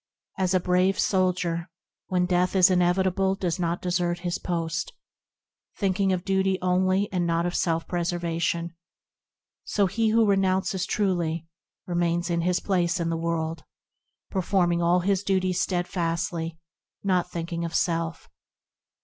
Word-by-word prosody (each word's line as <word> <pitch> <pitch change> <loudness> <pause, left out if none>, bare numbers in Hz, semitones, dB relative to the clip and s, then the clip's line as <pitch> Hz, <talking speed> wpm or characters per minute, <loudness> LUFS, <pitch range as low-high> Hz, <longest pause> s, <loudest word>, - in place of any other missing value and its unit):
As 185 0 +2
a - - +4
brave 180 +2 +2
soldier, 180 -2 0 0.4
when 180 -1 +1
death 180 +1 +1
is 190 0 +6
inevitable 185 +2 +2
does 180 -2 -2
not 170 0 -1
desert 175 -1 0
his 175 0 -2
post, 170 0 -2 0.8
Thinking 195 -1 +1
of 185 -1 -1
duty 190 -1 +1
only, 185 +2 +2
and 175 -2 0
not 170 0 +1
of 175 - -1
self 165 -3 0
preservation, 170 -1 -1 0.9
So 205 - +1
he 220 +4 +1
who 225 +1 +4
renounces 190 -2 +1
truely, 170 -5 0 0.4
remains 175 0 0
in 170 0 +1
his 180 +1 +1
place 180 -2 0
in 165 -1 -1
the - - 0
world, 165 -1 -2 0.7
Performing 180 -2 +1
all 175 +1 +3
his 195 +1 +1
duties 185 -2 0
steadfastly, 170 -2 -2 0.5
not 180 -3 +1
thinking 170 -1 -4
of 170 0 -4
self. 165 -1 -1
180 Hz, 135 wpm, -26 LUFS, 170-190 Hz, 0.9 s, is